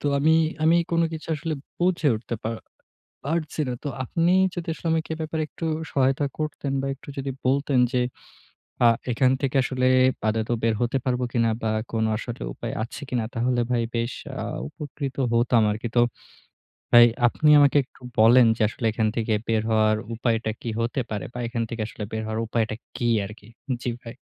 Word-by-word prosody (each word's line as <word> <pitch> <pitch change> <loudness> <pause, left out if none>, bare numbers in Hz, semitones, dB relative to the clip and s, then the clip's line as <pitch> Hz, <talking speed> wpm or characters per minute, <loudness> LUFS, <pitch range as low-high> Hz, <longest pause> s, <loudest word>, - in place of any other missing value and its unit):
তো - - -1
আমি 155 +3 +4 0.3
আমি 165 +2 +5
কোন 170 0 +2
কিছু 160 0 -7
আসলে 155 +1 -3 0.2
বুঝে 175 -3 +2
উঠতে 115 +2 -5
পা 110 - -2 0.7
পারছি 155 +1 -2
না। - - -1
তো - - -1 0.2
আপনি 165 +7 +1 0.2
যদি 175 -1 -5
আসলে 170 - -9
আমাকে 160 0 -1
এ - - -10
ব্যাপারে 160 0 -2
একটু 165 - -5 0.3
সহায়তা 135 +1 +2
করতেন 150 -2 -3
বা - - -2
একটু 135 - -18
যদি 135 0 -3 0.2
বলতেন 140 0 +2
যে 125 - +2 0.9
আ - - +9 0.2
এখান 125 +2 +3
থেকে 140 -1 -1
আসলে 130 0 0 0.4
আদতেও 110 +2 0
বের 115 -1 +3
হতে 120 +2 +1
পারব 125 -1 0
কিনা? 115 -1 +2
বা 110 - 0 0.2
কোন 115 -1 0
আসলে 120 +1 -6
উপায় - - -5
আছে 115 - -8
কিনা? 120 -3 0
তাহলে 120 +1 0
ভাই 120 -1 +2
বেশ 115 +1 -1 0.3
আ - - -3 0.3
উপকৃত 140 - -6 0.2
হতাম 115 -1 +3
আরকি। 110 +3 -3
তো 120 - +6 0.9
ভাই, 120 0 +9 0.2
আপনি 150 +5 +2
আমাকে 145 0 +5
একটু 130 - -25 0.2
বলেন 120 +3 +7
যে, - - -4
আসলে 115 - -5
এখান 110 0 0
থেকে 115 -1 0
বের 110 -1 +2
হওয়ার 110 -1 +3 0.2
উপায়টা 115 -1 0
কি 120 - -4
হতে 120 +3 0
পারে? 105 -4 -3
বা - - -7
এখান 115 -1 -2
থেকে 115 -1 -4
আসলে 110 - -7
বের 110 0 -3
হওয়ার 110 +1 -2
উপায়টা 110 -1 -1 0.2
কি 120 - 0 0.2
আরকি? 105 +1 -12 0.4
জি - - -1
ভাই। 115 +1 -9
125 Hz, 185 wpm, -25 LUFS, 115-145 Hz, 0.9 s, আ